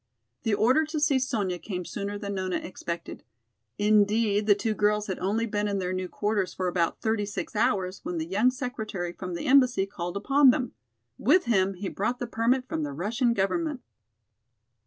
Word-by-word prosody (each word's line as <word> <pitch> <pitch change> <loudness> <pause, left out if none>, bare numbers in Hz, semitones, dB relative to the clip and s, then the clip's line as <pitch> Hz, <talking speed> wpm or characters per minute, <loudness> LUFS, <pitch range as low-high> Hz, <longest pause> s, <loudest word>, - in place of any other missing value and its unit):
The 225 -5 +1
order 255 +9 +4
to 310 0 -3
see 295 -3 +3
Sonya 205 -9 -1
came 180 -3 -5
sooner 200 +3 -4
than 200 -1 -5
Nona 185 -1 -2
expected. 170 -2 -5 0.6
Indeed, 210 0 +3
the 205 - +6
two 220 +2 -1
girls 210 0 +1
had 190 -3 -4
only 210 +5 0
been 210 -2 -1
in 200 -1 -1
their 185 -1 -2
new 185 0 -2
quarters 205 -3 -1
for 185 - -1
about 175 -2 0
thirty 220 -1 0
six 205 +2 -5
hours 195 -3 +1
when 175 - -4
the 160 - -2
young 205 +8 +3
secretary 220 -9 -4
from 180 0 -6
the - - -5
embassy 255 -7 +4
called 175 -2 -5
upon 275 +6 +5
them. 250 0 +1 0.5
With 365 - +4
him 195 -4 +2
he 190 +2 -5
brought 215 +7 -2
the 245 - -3
permit 240 +3 0
from 160 - -3
the 145 -2 -3
Russian 235 - 0
government. 280 - -1
205 Hz, 185 wpm, -27 LUFS, 185-240 Hz, 0.6 s, the